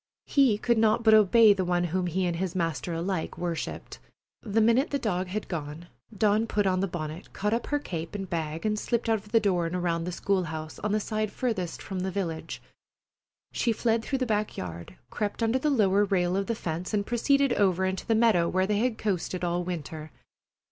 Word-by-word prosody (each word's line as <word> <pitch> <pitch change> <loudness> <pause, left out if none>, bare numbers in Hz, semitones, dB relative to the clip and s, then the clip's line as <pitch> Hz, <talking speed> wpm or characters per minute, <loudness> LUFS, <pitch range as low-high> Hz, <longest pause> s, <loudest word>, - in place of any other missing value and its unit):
He 265 -7 +3
could 235 +1 +1
not 220 +1 +3
but 220 -1 +6
obey 215 +1 +7
the 190 -2 -1
one 175 0 +1
whom 180 +1 -1
he 185 +2 0
and 170 -1 -1
his 185 0 -3
master 165 -3 -2
alike 170 +1 -3
worshipped. 170 -2 -4 0.4
The 220 0 0
minute 235 +7 +3
the 285 - 0
dog 190 -7 -1
had 205 +4 -4
gone, 160 0 -6 0.3
Dawn 215 +2 +2
put 205 -2 0
on 185 -1 +2
her 195 - +1
bonnet, 165 -1 -6
caught 210 +2 -1
up 235 - -1
her 290 - +1
cape 165 - -5
and 195 -1 -4
bag, 160 0 -3
and 215 0 +1
slipped 235 0 -1
out 220 -1 +3
of 210 +1 -17
the 230 - +5
door 180 -5 +1
and 170 - -4
around 170 -2 -1
the 180 - -3
school 190 +1 0
house 155 -1 -6
on 210 - -2
the 215 - +2
side 215 0 -2
farthest 210 -10 -3
from 190 -1 -5
the 190 +1 -1
village. 175 -4 -4 0.9
She 235 - 0
fled 225 0 +1
through 270 - -1
the 255 - 0
back 210 -2 -1
yard, 85 -1 -7 0.2
crept 210 +2 -2
under 225 +3 +2
the 300 - +1
lower 205 -7 +3
rail 180 -2 +1
of 195 0 -1
the 230 - -1
fence, 175 +1 -3
and 200 -1 0
proceeded 275 +3 +2
over 190 -3 +2
into 190 0 -3
the 225 - +3
meadow 215 -7 +3
where 185 0 +1
they 205 +1 0
had 240 0 0
coasted 185 -3 -2
all 175 0 0
winter. 160 -3 -5
195 Hz, 215 wpm, -27 LUFS, 175-220 Hz, 0.9 s, obey